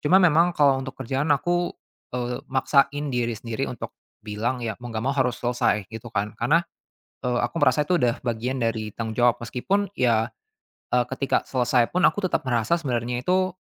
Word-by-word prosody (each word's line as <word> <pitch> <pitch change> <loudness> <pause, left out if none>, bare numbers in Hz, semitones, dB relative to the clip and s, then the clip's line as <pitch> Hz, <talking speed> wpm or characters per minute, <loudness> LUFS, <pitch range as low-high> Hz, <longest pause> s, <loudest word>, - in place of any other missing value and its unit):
cuma 160 +5 +4
memang 170 -1 +4
kalau 140 -2 +4
untuk 130 0 -7
kerjaan, 135 +3 -2
aku, 175 +3 0 0.5
eee, 125 0 -3
maksain 140 +2 +2
diri 120 -2 -1
sendiri 115 +4 -3
untuk 125 - -6 0.3
bilang, 110 +4 -2
ya 110 - -1
mau 120 - -7
nggak 110 -1 -4
mau 135 - +1
harus 125 -2 +1
selesai, 120 -4 0
gitu 115 +1 -7
kan, 105 -1 -2
karena, 150 +9 +3 0.6
eee, 125 -1 +1
aku 120 +6 -2
merasa 145 -1 +4
itu 180 - +3
udah 120 -5 +1
bagian 125 +2 -2
dari 110 -2 -1
tanggung 110 -1 -4
jawab, 120 0 +4
meskipun 195 - -1
ya, 115 -3 +2 0.6
eee, 125 -1 +3
ketika 135 +1 0
selesai 125 -2 +2
pun 180 - +1
aku 205 - +3
tetap - - 0
merasa 120 +3 +1
sebenarnya 125 -6 -2
itu, 185 +3 +1
125 Hz, 180 wpm, -24 LUFS, 115-145 Hz, 0.6 s, cuma